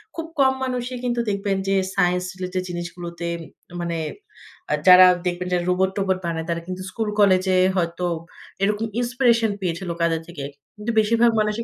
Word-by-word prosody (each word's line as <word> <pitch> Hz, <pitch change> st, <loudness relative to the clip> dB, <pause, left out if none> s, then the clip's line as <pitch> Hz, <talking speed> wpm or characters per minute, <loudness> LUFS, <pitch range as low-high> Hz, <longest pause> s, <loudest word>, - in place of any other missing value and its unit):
খুব 330 Hz, -1 st, -4 dB
কম 265 Hz, -1 st, +5 dB
মানুষই 250 Hz, -1 st, -3 dB
কিন্তু 240 Hz, -1 st, 0 dB
দেখবেন 200 Hz, -1 st, -1 dB
যে 195 Hz, -, +2 dB, 0.2 s
সাইন্স 180 Hz, -1 st, +2 dB
রিলেটেড 185 Hz, 0 st, -3 dB
জিনিসগুলোতে 170 Hz, 0 st, -6 dB, 0.5 s
মানে 170 Hz, -1 st, -2 dB, 0.7 s
আ -, -, +3 dB
যারা 185 Hz, 0 st, +10 dB, 0.2 s
দেখবেন 180 Hz, +1 st, -2 dB
যে -, -, +4 dB
রোবট-টোবট 190 Hz, +1 st, +1 dB
বানায় 165 Hz, -1 st, -3 dB
তারা 170 Hz, 0 st, -1 dB
কিন্তু 185 Hz, 0 st, -5 dB
স্কুল-কলেজে 200 Hz, -4 st, +2 dB, 0.2 s
হয়তো 170 Hz, +1 st, -1 dB, 0.6 s
এরকম 210 Hz, +2 st, +1 dB
inspiration 240 Hz, -3 st, +2 dB
পেয়েছিলো 175 Hz, 0 st, -2 dB
কাদের 165 Hz, -1 st, +1 dB
থেকে। 145 Hz, -5 st, -7 dB, 0.3 s
কিন্তু 215 Hz, +3 st, -3 dB
বেশিরভাগ 230 Hz, +2 st, +4 dB
মানুষই 210 Hz, +2 st, 0 dB
190 Hz, 145 wpm, -22 LUFS, 175-220 Hz, 0.7 s, যারা